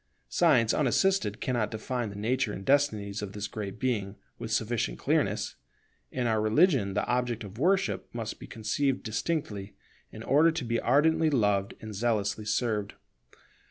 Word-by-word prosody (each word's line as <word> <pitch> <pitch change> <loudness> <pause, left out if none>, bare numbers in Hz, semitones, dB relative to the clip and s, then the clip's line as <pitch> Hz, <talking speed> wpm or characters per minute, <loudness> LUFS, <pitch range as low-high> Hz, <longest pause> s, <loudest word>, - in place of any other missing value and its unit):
Science 130 -10 +4
unassisted 150 - +2
cannot 120 -4 0
define 120 +1 -3
the 100 - -9
nature 115 +3 0
and 95 - -7
destinies 110 -8 +1
of 105 -1 -6
this 105 0 -4
Great 105 -3 -6
Being 105 -6 -1 0.2
with 110 - -5
sufficient 110 - 0
clearness. - - 0 0.5
In 125 -1 -2
our 110 -2 +2
religion 110 - +3
the - - +1
object 120 -2 -1
of 105 +2 -10
worship 190 +5 +1
must 115 -2 -5
be - - -9
conceived 130 +5 -1
distinctly, 110 -4 -3 0.4
in - - -9
order 155 +4 +5
to 160 -6 -3
be 115 0 0
ardently 160 +5 +3
loved 105 -7 +1
and 110 -1 -7
zealously 105 -1 -1
served. 105 -2 -1
115 Hz, 155 wpm, -29 LUFS, 105-135 Hz, 0.5 s, order